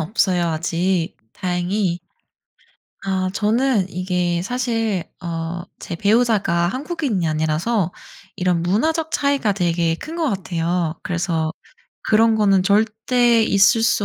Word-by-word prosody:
없어요 175 0 +1
아직 170 +2 -1 0.2
다행히. 180 +1 -1 1.1
아 190 -1 0
저는 220 -1 +1
이게 180 -2 -1
사실 225 -4 -1 0.2
어 165 -2 -4 0.3
제 175 - -6
배우자가 200 -4 +2
한국인이 260 - -2
아니라서 160 +5 0 0.4
이런 180 -2 0
문화적 315 - 0
차이가 280 -9 +1
되게 170 -3 0
큰 315 - -8
것 325 -3 0
같아요. 170 -3 -2
그래서 165 -2 -1 0.5
그런 225 +1 +3
거는 195 -3 +3
절대 225 +3 +2
있을 210 +2 +4
수 225 -2 +2
190 Hz, 240 characters per minute, -20 LUFS, 175-225 Hz, 1.1 s, 있을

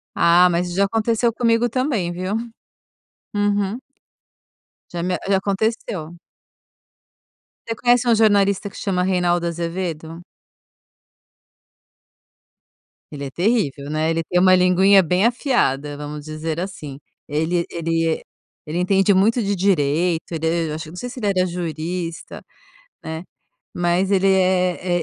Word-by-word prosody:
Ah, 175 +2 +5
mas 175 +1 -1
já 200 +2 +2
aconteceu 225 +3 +1
comigo 230 0 +2
também, 235 - -1
viu? 185 +3 -4 1.0
Uhum. 205 +1 0 1.2
Já 170 - -3
me 180 +1 -1
já 195 - +4
aconteceu. 195 -4 -2 1.6
Você 230 - -2
conhece 245 +2 +2
um 235 - +5
jornalista 200 -2 +2
que - - -14
chama 185 -3 -1
Reinaldo 175 -2 +1
Azevedo? 170 -1 -4 2.9
Ele 140 -1 -6
é - - -5
terrível, 170 - 0
né? 155 +1 0
Ele 165 0 0
tem 180 +2 0
uma 185 0 +6
linguinha 185 +2 +5
bem 180 +5 +1
afiada, 150 - 0
vamos 150 0 -7
dizer 155 +2 -4
assim. 155 -8 -7 0.3
Ele 160 +4 0
ele 165 -1 -1 0.4
ele 155 +2 -4
entende 195 +2 +3
muito 220 +5 +3
de 200 - 0
direito, 175 -2 +1
ele 165 0 -1
acho 155 +1 -5
que - - -11
não - - -11
sei 245 +7 -5
se 250 - -9
ele 210 - -1
era 185 -2 +2
jurista, 170 0 -5 0.6
né, 160 0 -5 0.5
mas 175 +2 +1
ele 195 -1 +3
é 185 -2 +1
180 Hz, 125 wpm, -21 LUFS, 165-200 Hz, 2.9 s, uma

